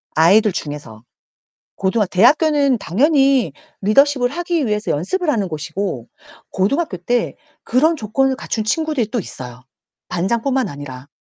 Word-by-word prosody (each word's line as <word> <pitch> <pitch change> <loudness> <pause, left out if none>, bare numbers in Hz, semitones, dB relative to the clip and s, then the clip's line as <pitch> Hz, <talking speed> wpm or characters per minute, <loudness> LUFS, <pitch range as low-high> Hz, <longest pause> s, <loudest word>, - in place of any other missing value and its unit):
아이들 200 +7 +5
중에서. 145 -10 -7 0.7
고등학 195 +1 0
대학교는 280 - +3
당연히 270 - +2 0.3
리더십을 250 +5 +3
하기 340 0 -1
위해서 210 -1 -2
연습을 305 - -1
하는 215 -9 0
곳이고 155 - -4 0.4
고등학교 205 - -1
때 240 +8 -1 0.3
그런 310 +7 +2
조건을 265 +2 0
갖춘 220 -4 -3
친구들이 275 -2 -1
또 240 - 0
있어요, 125 -8 -7 0.5
반장 190 +6 -1
뿐만 260 -5 0
아니라. 140 -2 -9
220 Hz, 320 characters per minute, -19 LUFS, 175-275 Hz, 0.7 s, 아이들